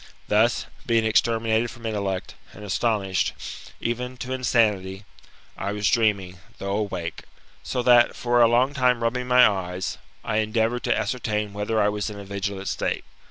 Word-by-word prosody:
Thus, 110 +3 +2 0.2
being 115 -2 +3
exterminated 115 +1 +2
from 115 0 -11
intellect, 100 -4 -2 0.2
and 105 - -10
astonished, 100 -2 0 0.5
even 125 +2 -3
to 130 +1 -4
insanity, 105 -6 +1 0.5
I 100 - -3
was 105 -1 +1
dreaming, 100 -6 +1 0.2
though 100 0 -3
awake; 95 -5 -3 0.4
so 125 - -2
that, 120 -1 +5
for 120 0 +2
a 115 - +7
long 125 +4 +3
time 125 -3 +2
rubbing 125 +2 -1
my 125 0 +7
eyes, 95 -2 -3 0.2
I 105 - -1
endeavoured 110 +2 +1
to - - +2
ascertain 105 -4 -2
whether 105 +2 -1
I 105 0 +3
was 105 +1 -2
in 105 - -8
a 100 - -8
vigilant 100 0 -4
state. - - -2
110 Hz, 160 wpm, -24 LUFS, 100-120 Hz, 0.5 s, a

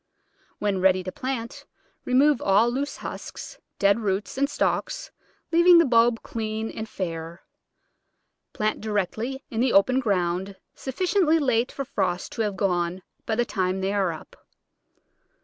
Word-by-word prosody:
When 200 -3 -1
ready 185 0 +3
to 185 - -5
plant, 255 -1 -5 0.4
remove 270 +2 +4
all 205 +5 +3
loose 280 +3 -3
husks, - - -8 0.2
dead 200 +2 +3
roots, 200 -2 -2
and 280 +1 +1
stalks, - - -1 0.4
leaving 345 +1 +7
the 335 - +6
bulb 235 -2 +3
clean 220 0 -4
and 220 0 -6
fair. 165 -1 -5 1.1
Plant 215 0 -1
directly 220 +6 -2
in 225 - -3
the 250 +1 +2
open 255 +7 +4
ground, 190 -4 -1 0.2
sufficiently 340 - +1
late 250 -5 +1
for 275 - -5
frost 185 -8 -2
to - - -3
have 205 -3 -1
gone 180 -1 0 0.2
by 220 - 0
the 240 +1 +1
time 185 -3 -1
they 195 +1 -1
are 195 -4 +1
up. 160 - -10
220 Hz, 145 wpm, -25 LUFS, 190-255 Hz, 1.1 s, leaving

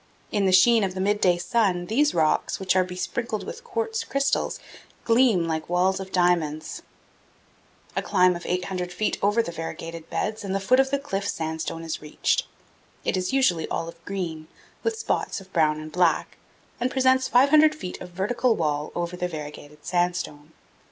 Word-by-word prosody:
In 200 -2 +1
the - - +3
sheen 220 +4 +6
of 190 -1 -2
the - - -4
midday 190 -2 +2
sun, 185 -3 +1
these 275 +8 +2
rocks, 155 -2 +1
which 190 -1 +1
are 185 - +5
besprinkled 190 +5 -3
with 470 +1 -8
quartz 455 -1 -2
crystals, 275 0 0 0.4
gleam 230 -7 +4
like 160 0 -3
walls 185 +2 +2
of 190 0 -7
diamonds. 170 -4 0 1.1
A - - +1
climb 180 0 +3
of 175 - -7
800 180 0 -2
feet 195 +5 -1
over 205 +3 +3
the 170 - -5
variegated 165 0 -7
beds 215 +1 -2
and 195 -1 -2
the - - +1
foot 250 +7 +3
of 270 0 +4
the 280 - +1
cliff 200 -8 -3
sandstone 160 0 -3
is 165 -1 -4
reached. 150 0 0 0.6
It - - +1
is 185 -1 -1
usually 255 -12 +2
olive 165 0 -5
green, 170 -6 -4 0.3
with 455 -1 -1
spots 455 - -1
of 195 0 -16
brown 155 -2 +2
and 155 0 -8
black, 175 -1 +1 0.4
and 245 - +1
presents 260 0 +3
500 300 +5 +5
feet 185 -12 -7
of 180 - -7
vertical 220 +6 +1
wall 150 -2 -1
over 175 +1 -2
the 180 0 -2
variegated 150 -2 -9
sand 175 0 +1
stone. 150 -3 -6
185 Hz, 175 wpm, -25 LUFS, 165-230 Hz, 1.1 s, sheen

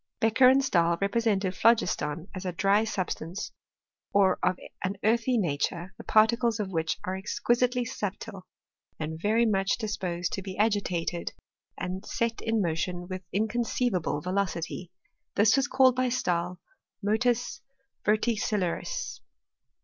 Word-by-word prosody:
Bec 225 0 +1
cher 255 -1 +9
and 270 +1 +4
Stahl 170 -7 +2
represented 200 -2 +1
phlogiston 165 -6 +2
as 185 -1 -6
a 185 - -2
dry 195 +4 +3
sub 190 -5 -2
stance, 170 +6 -5 0.6
or 195 -2 +3
of 185 - +1 0.3
an 190 +2 -1
earthy 235 +3 +2
nature, 170 +1 -1
the - - -8
particles 230 +1 +3
of 200 -2 -2
which 160 -2 -1
are 185 - -2
exquisitely 240 +5 +1
subtile, 200 -3 -5 0.5
and 160 +1 -4
very 220 +4 +3
much 195 -3 +1
disposed 185 -6 -3
to 195 - -2
be 190 -1 -7
agitated 185 -5 0 0.4
and 185 +1 -4
set 230 -1 -2
in 225 -2 +1
motion 175 +2 -2
with 185 0 -4
inconceivable 220 -5 0
velocity. 180 -1 -2 0.4
This 210 +3 +5
was 270 0 +2
called 260 -2 +4
by 255 0 +1
Stahl 180 -7 -1 0.4
motus 235 +3 +1 0.4
verticillaris. 215 - 0
200 Hz, 135 wpm, -28 LUFS, 180-230 Hz, 0.6 s, cher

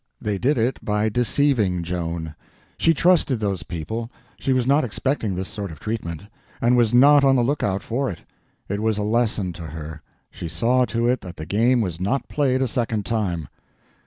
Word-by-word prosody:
They 105 -2 -2
did 135 +6 +2
it 120 +3 0
by 105 +1 +1
deceiving 115 -6 +1
Joan. 85 -2 -3 0.5
She 165 - +4
trusted 165 -6 +3
those 100 -5 -1
people, 90 +10 -5 0.3
she 135 - -1
was 130 -2 +2
not 140 +4 +3
expecting 115 -3 -1
this 95 +1 -3
sort 100 -4 -5
of 75 - -11
treatment, 85 -7 -4 0.4
and 120 +1 +3
was 120 -3 +3
not 140 +4 +6
on 135 -1 +5
the 125 - +3
lookout 110 -7 0
for 130 +4 -1
it. 85 - -7 0.5
It 100 +1 -2
was 110 -1 +1
a 105 - -1
lesson 105 -4 0
to 85 -1 -8
her; 80 +1 -8 0.3
she - - -6
saw 125 +8 +2
to 115 0 -1
it 125 0 +1
that 90 -1 -9
the 80 - -6
game 115 +7 +2
was 90 -6 -3
not 115 +9 -1
played 135 -3 +1
a - - +1
second 115 -3 -1
time. 95 - -1
110 Hz, 190 wpm, -23 LUFS, 90-125 Hz, 0.5 s, not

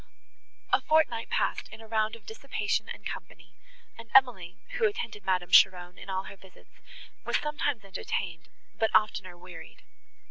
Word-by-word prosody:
A - - +5
fortnight 305 -8 +2
passed - - 0
in 220 - -11
a 225 - -12
round 220 0 0
of 225 -3 -16
dissipation 220 -1 -2
and - - -8
company, - - -8 0.5
and 230 -1 -11
Emily, 230 -10 +4
who 485 -2 +2
attended 230 - -5
Madame 180 -2 0
Cheron 180 -1 +5
in - - -10
all 190 0 -1
her 200 - -10
visits, 190 -1 -19 0.5
was - - +1
sometimes 290 -7 -2
entertained, 180 -3 -4 0.3
but 220 - +3
oftener 190 -4 +1
wearied. 175 -1 -12
215 Hz, 150 wpm, -29 LUFS, 185-230 Hz, 0.5 s, A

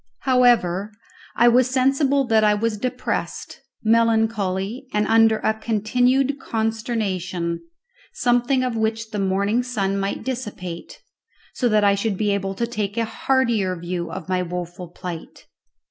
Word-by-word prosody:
However, 235 -7 +3 0.4
I 240 - +5
was 250 +1 +4
sensible 270 +1 +2
that 220 -2 +3
I 210 0 +4
was 215 0 -1
depressed, 255 +3 -3 0.2
melancholy, 225 -1 +1
and 210 0 +1
under 225 0 +4
a 220 - +3
continued 245 +6 +1
consternation, 205 -7 -2 0.5
something 245 +2 +1
of 250 -2 -1
which 220 0 -2
the 210 - -3
morning 200 +4 +1
sun 200 -6 -1
might 195 0 -3
dissipate, 210 -9 -6 0.5
so 245 - 0
that 215 -1 +3
I 200 -1 +5
should 200 0 -1
be 210 0 +1
able 195 -1 -2
to 235 - -1
take 210 -3 -4
a 230 - +1
heartier 230 -7 0
view 175 0 -4
of 185 -4 -7
my 185 -1 0
woful 180 0 -5
plight. 170 -1 -8
220 Hz, 140 wpm, -22 LUFS, 195-240 Hz, 0.5 s, I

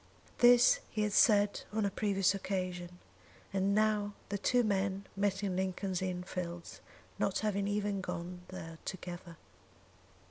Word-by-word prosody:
This 245 - +7
he 215 - -1
had 210 -1 -1
said 205 -4 +4
on 215 0 0
a 200 - 0
previous 195 -2 +2
occasion, 185 -2 -3 0.6
and 195 +1 +2
now 210 -1 +2 0.2
the 205 - -1
two 245 +4 +3
men 195 -2 0
met 200 0 0
in 190 -2 -1
Lincoln's 185 0 -2
Inn 180 -1 -2
Fields, 175 -2 -6 0.4
not - - +1
having 200 -1 0
even 205 -1 -1
gone 180 0 -5
there 165 -3 -8
together. 175 -2 -7
195 Hz, 140 wpm, -33 LUFS, 180-205 Hz, 0.6 s, This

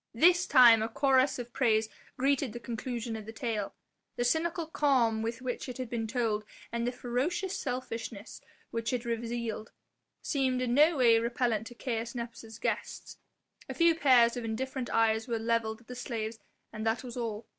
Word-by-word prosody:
This 350 +7 +5
time 240 -4 +8
a 220 - -1
chorus 270 0 +3
of 240 -1 -7
praise 225 -4 +2 0.3
greeted 275 -2 +1
the 240 - -6
conclusion 235 -1 -4
of 215 -1 -8
the - - -5
tale. 225 -3 -3 0.4
The 240 - -1
cynical 325 +6 0
calm 260 -8 +2
with 230 +3 -4
which 255 +1 -4
it 250 - -6
had 255 -3 -5
been 225 -2 -2
told 220 -3 0 0.3
and 235 +1 -1
the - - +1
ferocious 280 +11 -2
selfishness 230 -4 -5 0.3
which 230 +1 -2
it 245 -1 -2
revealed 230 -1 -3 0.5
seemed 260 -3 0
in 250 -1 0
no 305 +4 +5
way 235 -3 +5
repellent 235 -2 0
to 240 - -11
Caius 235 -1 -3
Nepos' 230 -2 -7
guests. - - -4 0.5
A - - -4
few 335 -1 +5
pairs 255 -7 +5
of 245 - -4
indifferent 250 +3 -3
eyes 225 0 +2
were 235 -2 -1
levelled 225 0 -1
at 235 - -23
the 250 - -7
slaves 225 -2 -4 0.3
and 215 - -5
that 225 +2 0
was 245 -2 -8
all. 225 -3 -4
235 Hz, 175 wpm, -30 LUFS, 225-255 Hz, 0.5 s, time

